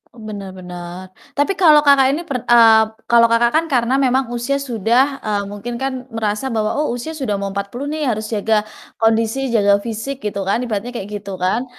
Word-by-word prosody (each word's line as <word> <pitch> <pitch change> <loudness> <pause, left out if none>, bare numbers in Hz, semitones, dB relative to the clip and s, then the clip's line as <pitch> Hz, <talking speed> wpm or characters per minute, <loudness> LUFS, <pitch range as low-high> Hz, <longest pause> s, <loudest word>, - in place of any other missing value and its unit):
Oh, 225 - -13
benar 200 -3 -7
benar. 180 0 -9 0.2
Tapi 290 +7 +1
kalau, 305 -4 +6
Kakak, 280 -2 +5
ini 335 - -4
pern 270 -7 -5
eee, 225 -2 +7 0.3
kalau, 235 -1 +6
Kakak, 235 +1 +3
kan 325 +1 +2
karena 255 0 +1
memang 260 -1 +1
usia 240 +3 -1
sudah, 250 +3 +1
eee, 205 -1 -2
mungkin 235 +4 -6
kan 260 0 -4
merasa 220 +3 -2
bahwa, 220 +2 -1
"Oh, 305 - +1
usia 280 +7 -6
sudah 215 -8 -2
mau 200 0 -3
40 200 +8 -5
nih, 305 -3 -2
harus 215 -2 -2
jaga 215 0 +1 0.4
kondisi, 225 +3 +1
jaga 200 -2 +3
fisik," 235 +4 -5
gitu 200 -2 -3
kan 230 +5 +1
ibaratnya 235 +1 -4
kayak 200 -2 -5
gitu 200 -1 -7
kan, 190 +8 -1
230 Hz, 195 wpm, -18 LUFS, 205-265 Hz, 0.4 s, eee